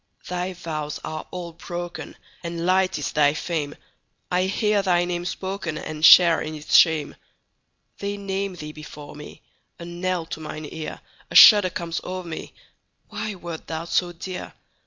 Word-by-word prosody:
Thy 180 +1 -3
vows 155 -4 -5
are 155 0 -6
all 175 -2 -6
broken, 175 0 -7 0.3
And 170 0 -4
light 185 0 +2
is 150 - -3
thy 145 0 +3
fame:I 170 +3 -4
hear 205 +1 +1
thy 175 -2 +2
name 175 0 -3
spokenAnd 160 -5 -4
share 170 +1 +8
in 155 0 -5
its 150 -1 -1
shame. 160 -4 +5 0.8
They 200 0 -3
name 195 -1 -3
thee 150 -3 -7
before 150 -1 -11
me,A 150 +3 -13
knell 175 0 -2
to 160 - -7
mine 155 0 -7
ear;A 160 -1 -9
shudder 205 -4 +10
comes 170 -1 -4
o'er 185 0 -5
me—Why 175 +4 -9
wert 170 -3 -8
thou 160 0 -4
so 175 +1 0
dear? 180 +2 -7
175 Hz, 140 wpm, -24 LUFS, 155-185 Hz, 0.8 s, shudder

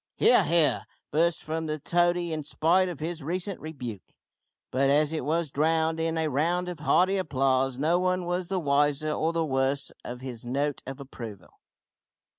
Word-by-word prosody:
"He - - +5
ar, 245 - +6
he 170 -2 +4
ar!" 110 -6 -2 0.2
burst 165 +2 +1
from 160 +1 -3
the 155 0 -2
toady 175 +2 +1
in 155 -1 -3
spite 170 +5 +2
of 175 - -7
his 165 +1 -4
recent 180 +6 -3
rebuke; 125 -10 -8 0.6
but 135 +1 +2
as 150 +2 +3
it 155 - -2
was 160 +1 0
drowned 160 +2 +1
in 165 0 -1
a 160 -1 +1
round 170 +6 0
of 175 -3 -6
hearty 185 +5 +3
applause 135 -5 +1
no 160 +5 +2
one 185 0 0
was 175 0 -2
the 190 0 -1
wiser 145 0 +1
or 160 +2 0
the 165 -1 0
worse 135 0 0
of 125 +1 -7
his 125 -3 -6
note 140 +4 -1
of 135 +1 -6
approval. 115 -8 -10
155 Hz, 185 wpm, -27 LUFS, 135-170 Hz, 0.6 s, ar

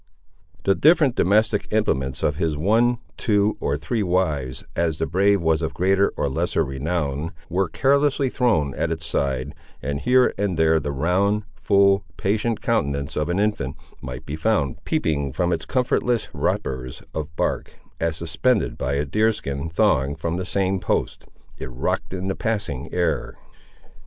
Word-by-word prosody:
The 100 - +4
different 150 - +4
domestic 105 +1 +2
implements 65 -12 0
of 75 - +1
his 80 -3 0
one, 115 +9 +3 0.2
two, 105 -1 +2
or 70 - 0
three 80 +9 -2
wives, 80 -9 0
as 80 -2 0
the 80 - 0
brave 95 +2 +2
was 80 0 +2
of 80 - -3
greater 95 +2 +3
or - - 0
lesser 65 - 0
renown, 75 +2 -2 0.2
were 95 +2 0
carelessly 140 0 +2
thrown 110 - +1
at 85 - -1
its 80 0 -4
side, 70 -3 -1 0.3
and 70 +1 -3
here 125 +6 +4
and 100 -4 0
there 80 0 +4
the 70 -1 -3
round, 95 +9 +1
full, 100 0 +3
patient 110 +3 0
countenance 70 - 0
of 75 +2 -1
an 90 - 0
infant 105 -11 0 0.3
might 65 0 -7
be 75 - -4
found 80 - 0
peeping 70 -3 0
from 85 +3 +1
its 80 - -3
comfortless 125 -2 0
wrappers 65 -1 -2
of 80 0 -5
bark, - - -2 0.2
as, 80 -1 -1
suspended 85 +9 0
by 65 - -1
a 70 +1 0
deer 110 +10 +2
skin 70 -6 -4
thong 70 -3 +2
from 80 +1 -3
the 90 -1 -4
same 95 0 0
post, - - -2 0.3
it 65 - -5
rocked 60 0 -2
in 95 0 -4
the 95 - -1
passing 100 - -3
air. 90 -1 -1
85 Hz, 160 wpm, -23 LUFS, 70-105 Hz, 0.3 s, The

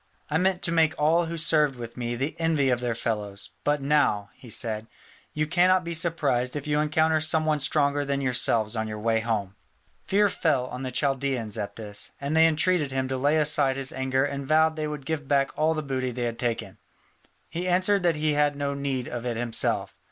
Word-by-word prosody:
I 155 - +2
meant 185 0 +1
to 170 - 0
make 165 0 +3
all 165 +3 +3
who 170 +1 -4
served 155 -3 +2
with 120 -1 -8
me 120 -1 -3
the 135 +6 -3
envy 155 -5 +2
of 125 - +1
their 120 -2 -2
fellows; 105 -3 -3
but 145 -1 0
now," 140 -8 +1
he 125 - -15
said, 110 -1 -2 0.4
"you 155 0 -1
cannot 180 +3 +3
be 170 0 -4
surprised 150 -7 0
if 145 - -4
you 150 0 +1
encounter 155 +1 +2
some 155 0 +2
one 155 -1 +1
stronger 145 0 +2
than 140 0 -1
yourselves 120 -4 +1
on 110 0 -2
your 110 0 -5
way 110 +1 +1
home." 110 -4 -2 0.5
Fear 205 +1 +4
fell 145 -9 0
on 125 0 -7
the 130 - -3
Chaldaeans 135 -4 -1
at 100 -2 -4
this, 105 -2 -4
and 140 +3 -2
they 160 0 +6
intreated 160 -2 +1
him 130 0 -1
to 130 - -1
lay 145 +4 +2
aside 150 -3 +3
his 135 0 -3
anger 130 +1 0
and 140 -1 -4
vowed 160 +1 +3
they 155 -1 -2
would 150 -2 -6
give 150 -1 -3
back 140 -1 +2
all 160 +1 +1
the 155 - -3
booty 130 -2 -2
they 125 0 -4
had 115 -1 -3
taken. 120 -2 -3 0.7
He 175 +2 -4
answered 185 +3 +3
that 170 -2 +2
he 150 0 0
had 145 0 +2
no 140 0 -2
need 140 -3 -3
of 120 -1 -5
it 120 -2 -2
himself. 120 -1 0
140 Hz, 215 wpm, -26 LUFS, 125-155 Hz, 0.7 s, they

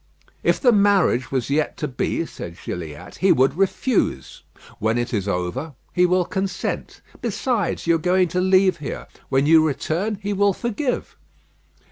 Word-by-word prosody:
"If - - +2
the 250 - +5
marriage 200 - +3
was 130 0 -1
yet 150 +1 0
to 150 - -2
be," 140 +5 -2
said 85 - -9
Gilliatt, 85 0 -7
"he 190 - +3
would 130 +3 +3
refuse. 195 - 0 0.4
When 110 +2 +1
it 120 +1 -2
is 100 -3 -1
over 90 - -3 0.2
he 180 0 +4
will 180 0 +2
consent. 190 +1 -3 0.2
Besides, 235 -3 -1
you 170 0 +3
are 160 - -11
going 185 0 +4
to 180 +2 0
leave 185 -1 +4
here. 150 -3 -6 0.2
When 135 +1 +2
you 160 +1 +6
return 160 +7 -1
he 205 +1 -4
will 200 0 +3
forgive." 240 +5 -3
170 Hz, 160 wpm, -22 LUFS, 130-195 Hz, 0.4 s, you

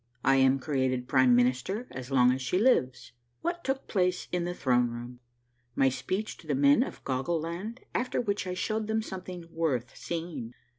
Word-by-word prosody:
— 125 - -39
I - - +4
AM 135 0 +5
CREATED 130 -3 -1
PRIME 130 -2 +5
MINISTER 125 - +1
AS 130 0 -7
LONG 125 -2 +5
AS 130 +1 -1
SHE 135 +8 0
LIVES. 190 - +2
— 120 - -46
WHAT 345 +1 -2
TOOK 270 0 -2
PLACE 180 -2 0
IN 180 -1 0
THE 175 0 -3
THRONE 125 -4 +2
ROOM. 120 +1 -8 0.3
— 120 0 -43
MY 135 - +4
SPEECH 190 - -3
TO 160 - -16
THE 145 - +1
MEN 140 +1 +5
OF - - -4
GOGGLE 135 +6 -1
LAND 180 +10 -5
AFTER 250 - -1
WHICH 200 -5 -1
I 180 - -2
SHOW 215 +4 -1
THEM 220 0 -1
SOMETHING 180 -3 -7
WORTH 140 -8 -1
SEEING. 165 -9 -5
145 Hz, 200 wpm, -29 LUFS, 125-185 Hz, 0.3 s, AM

